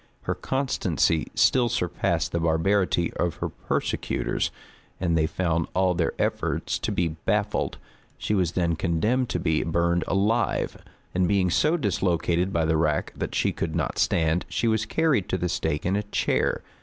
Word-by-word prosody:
Her - - -1
constancy 130 - 0
still 125 -2 +4
surpassed 85 -7 -1
the 85 - 0
barbarity 85 +2 +1
of 85 -2 0
her - - -3
persecutors, - - -2 0.5
and 85 -2 +1
they 80 -1 +2
found 85 -1 -1
all 95 -1 +3
their 85 -1 0
efforts - - -1
to - - -2
be 85 -1 0
baffled. 80 0 -1 0.4
She - - -2
was 90 -4 +1
then 85 -2 +1
condemned 105 +10 0
to 90 - -1
be 80 -1 +1
burned 85 +1 +1
alive; 105 +5 0 0.3
and 90 0 +2
being 95 -2 +2
so 155 - +3
dislocated 90 - 0
by 85 -3 +1
the 80 0 +2
rack 75 -2 0
that - - -4
she - - +2
could 80 -1 -3
not 80 -6 -1
stand, 80 +1 +1
she 115 - 0
was 110 -1 +1
carried 150 - +1
to 95 - 0
the 90 0 -1
stake 75 -2 -1
in 95 +2 +1
a 105 - +1
chair. 105 0 0
90 Hz, 170 wpm, -25 LUFS, 80-100 Hz, 0.5 s, still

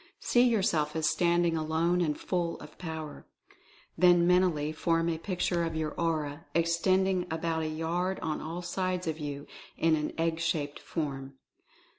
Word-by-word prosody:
See 240 - +3
yourself 190 -11 +2
as 160 -1 +1
standing 170 +1 +2
alone 160 +3 +1
and 155 -3 0
full 175 -2 -2
of 150 0 -12
Power. 160 -3 -6 0.7
Then 175 -1 +5
mentally 175 -4 +3
form 165 +1 +1
a 160 -1 -2
picture 175 -1 -1
of 165 -1 -2
your 155 -1 -1
Aura, 160 -2 -2
extending 180 +2 +2
about 160 0 -1
a 160 - -1
yard 170 +4 -1
on 155 -1 -2
all 170 +3 -5
sides 185 +1 -2
of 160 -1 -3
you, 145 -1 -5 0.3
in 165 -1 +3
an 150 -1 -2
egg 165 0 0
shaped 150 -3 -1
form. 135 -4 -4
165 Hz, 155 wpm, -30 LUFS, 155-175 Hz, 0.7 s, Then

